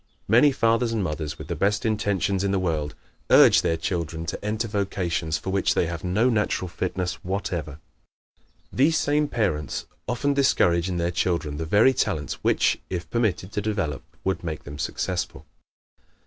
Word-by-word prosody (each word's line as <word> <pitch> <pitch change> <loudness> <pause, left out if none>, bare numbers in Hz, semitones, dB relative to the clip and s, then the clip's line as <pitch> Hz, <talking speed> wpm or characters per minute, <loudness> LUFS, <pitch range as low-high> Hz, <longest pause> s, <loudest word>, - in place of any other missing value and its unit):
Many 120 +7 +6
fathers 115 -2 +2
and 110 -3 0
mothers, 75 -3 -3
with - - -9
the - - -3
best 105 +2 0
intentions 100 -3 0
in 100 - +1
the 100 - +1
world, 80 -5 -1 0.3
urge - - +7
their 80 - 0
children 80 -1 -3
to 85 - -5
enter 110 +2 -1
vocations 90 -6 -1
for 95 +5 -5
which 95 0 +1
they - - +2
have 85 0 -5
no 100 +7 +2
natural 105 -5 0
fitness 90 0 -3
whatever. 90 -6 -3 1.0
These 155 +5 +3
same 150 0 +1
parents 95 - -1 0.2
often 140 +4 0
discourage 90 -10 +3
in 90 - -2
their 85 0 0
children 85 -4 -1
the 80 - -3
very 110 +9 +5
talents 80 - -2
which, - - +2
if 85 -2 -5
permitted 105 -5 0
to 105 - -2
develop, 100 -9 -2 0.2
would 95 0 -1
make 80 -3 -4
them 75 0 -9
successful. 90 -2 -3
95 Hz, 165 wpm, -25 LUFS, 85-110 Hz, 1.0 s, urge